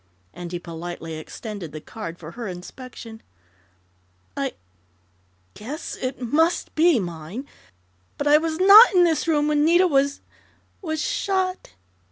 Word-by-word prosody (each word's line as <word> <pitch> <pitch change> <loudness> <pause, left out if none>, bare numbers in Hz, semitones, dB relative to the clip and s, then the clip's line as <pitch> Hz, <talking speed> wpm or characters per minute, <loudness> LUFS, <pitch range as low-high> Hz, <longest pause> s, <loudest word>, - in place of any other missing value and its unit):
and 175 -1 -8
he 175 - -3
politely 170 -1 -7
extended 175 +2 -7
the 155 - -7
card 170 0 -8
for 165 -1 -10
her 235 +1 -6
inspection. 220 +5 -10 1.1
"I 275 -2 -2 1.0
yes, 290 +10 -6
it 255 +1 -4
must 320 +8 +1
be 320 -4 +4
mine, 175 - -6 0.7
but 285 - -3
I 295 +1 +6
was 320 0 -2
not 400 +3 +9
in 360 - +6
this 330 -1 +1
room 300 -2 +2
when 300 -1 +2
Nita 345 +4 +5
was 280 -4 +1 0.6
was 315 -4 -3
shot!" 380 - -2
275 Hz, 135 wpm, -23 LUFS, -, 1.1 s, not